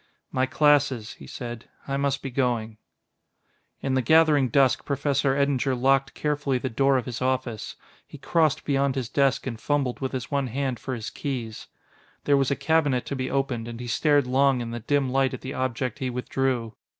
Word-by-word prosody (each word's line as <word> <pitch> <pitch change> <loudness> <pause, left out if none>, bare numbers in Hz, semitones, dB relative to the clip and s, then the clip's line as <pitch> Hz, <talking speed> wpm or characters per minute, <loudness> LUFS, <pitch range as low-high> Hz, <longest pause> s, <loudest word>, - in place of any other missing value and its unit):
"My 130 0 +1
classes," 145 -6 +2
he - - -13
said. 120 -2 -7 0.2
"I 135 - -1
must 140 0 -1
be 135 - -4
going...." 120 -4 -1 1.0
In 135 - 0
the 130 - +2
gathering 150 0 +4
dusk 135 +1 +3
Professor 140 -1 0
Eddinger 140 -2 +1
locked 135 +2 +2
carefully 145 -3 0
the 130 +1 -4
door 135 +3 +3
of 125 - -2
his 120 -1 -5
office. 130 -4 -2 0.3
He - - -11
crossed 155 +1 +1
beyond 140 -1 +1
his 130 -4 -3
desk 140 -2 +1
and 115 -4 -5
fumbled 140 -3 0
with 130 0 -3
his 130 -1 -4
one 140 -2 0
hand 130 0 -2
for 130 - -4
his 115 -2 -6
keys. 120 -6 -5 0.6
There 145 - +3
was 135 -1 +2
a 140 - +1
cabinet 140 -2 +1
to 140 - -4
be 130 -1 -3
opened, 135 -4 -1
and 120 0 -7
he 125 - -6
stared 145 +3 +2
long 135 +1 +3
in 115 -1 -4
the 120 - -4
dim 135 +3 0
light 135 0 +1
at - - -11
the 130 - -5
object 130 +1 -2
he 130 -2 -2
withdrew. 125 -2 -1
135 Hz, 195 wpm, -25 LUFS, 125-140 Hz, 1.0 s, gathering